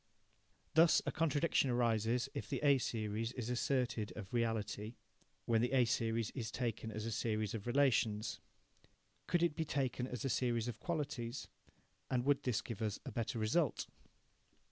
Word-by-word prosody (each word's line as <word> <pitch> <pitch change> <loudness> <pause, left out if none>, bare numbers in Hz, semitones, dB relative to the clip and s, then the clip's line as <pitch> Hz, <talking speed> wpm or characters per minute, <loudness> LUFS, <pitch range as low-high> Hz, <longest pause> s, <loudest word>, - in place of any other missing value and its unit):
Thus 160 0 +6
a - - 0
contradiction 155 -3 +2
arises 120 +1 +2
if - - -5
the - - -1
A 140 -2 +6
series 115 0 -2
is 125 -2 -3
asserted 125 -3 0
of 105 -1 -8
reality 110 -1 -1 0.5
when 115 -1 +3
the 125 +2 0
A 130 -2 +5
series 115 -1 0
is 115 -5 -4
taken 115 -1 -3
as 110 0 -4
a 115 - -2
series 110 -1 -1
of 110 0 -5
relations. 120 -5 +2 0.9
Could 175 -1 +2
it 170 -3 +2
be 160 - 0
taken 130 -4 -1
as 125 -2 -4
a - - +2
series 120 -2 +1
of 115 -2 -5
qualities, 135 -7 -3 0.6
and 125 -1 0
would 145 -1 +3
this 125 -5 0
give 115 -3 -6
us 105 -2 -1
a - - -5
better 115 0 -2
result? 120 +6 +1
120 Hz, 165 wpm, -36 LUFS, 110-135 Hz, 0.9 s, Thus